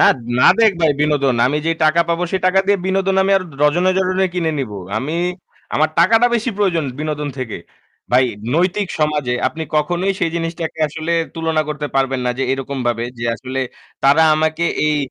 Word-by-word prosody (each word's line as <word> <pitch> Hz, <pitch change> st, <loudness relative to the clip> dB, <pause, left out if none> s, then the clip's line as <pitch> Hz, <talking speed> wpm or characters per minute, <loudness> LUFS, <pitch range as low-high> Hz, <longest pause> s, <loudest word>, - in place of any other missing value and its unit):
না, -, -, +6 dB, 0.3 s
না -, -, +4 dB, 0.2 s
দেক 220 Hz, -2 st, +5 dB
ভাই 160 Hz, -2 st, +4 dB
বিনোদন। 145 Hz, -4 st, +2 dB
আমি 145 Hz, +4 st, 0 dB
যেই 165 Hz, 0 st, +1 dB
টাকা 155 Hz, +2 st, +4 dB
পাবো 170 Hz, +1 st, 0 dB
সেই 190 Hz, -, -1 dB
টাকা 190 Hz, +1 st, +4 dB
দিয়ে 200 Hz, -1 st, +3 dB
বিনোদন 190 Hz, 0 st, +1 dB
আমি 195 Hz, -, 0 dB
আর 190 Hz, -, 0 dB, 0.2 s
ডজনে, 175 Hz, +5 st, +3 dB
ডজনে 185 Hz, 0 st, +1 dB
কিনে 165 Hz, -3 st, 0 dB
নিবো। 105 Hz, -7 st, -4 dB, 0.2 s
আমি 150 Hz, +6 st, -4 dB, 0.6 s
আমার 155 Hz, +1 st, +3 dB
টাকাটা 225 Hz, +7 st, +5 dB
বেশি 235 Hz, +2 st, 0 dB
প্রয়োজন 180 Hz, -7 st, +1 dB, 0.2 s
বিনোদন 150 Hz, -1 st, -3 dB
থেকে। 125 Hz, -4 st, -4 dB, 0.5 s
ভাই 130 Hz, +1 st, +5 dB, 0.3 s
নৈতিক 185 Hz, +4 st, +1 dB
সমাজে 150 Hz, -4 st, 0 dB, 0.2 s
আপনি 160 Hz, -, -7 dB
কখনোই 175 Hz, +6 st, 0 dB
সেই 165 Hz, -, +1 dB
জিনিসটাকে 165 Hz, -1 st, -4 dB
আসলে 160 Hz, +2 st, -4 dB, 0.2 s
তুলনা 160 Hz, -1 st, 0 dB
করতে 150 Hz, -1 st, -3 dB
পারবেন 135 Hz, -1 st, +1 dB
না -, -, +2 dB
যে 135 Hz, -, 0 dB
এরকম 135 Hz, +1 st, -4 dB
ভাবে 120 Hz, -1 st, 0 dB
যে 120 Hz, -, -4 dB
আসলে 130 Hz, +2 st, -6 dB, 0.5 s
তারা 140 Hz, +4 st, +5 dB
আমাকে 155 Hz, +2 st, 0 dB, 0.2 s
এই 150 Hz, 0 st, +2 dB
160 Hz, 185 wpm, -18 LUFS, 145-180 Hz, 0.6 s, না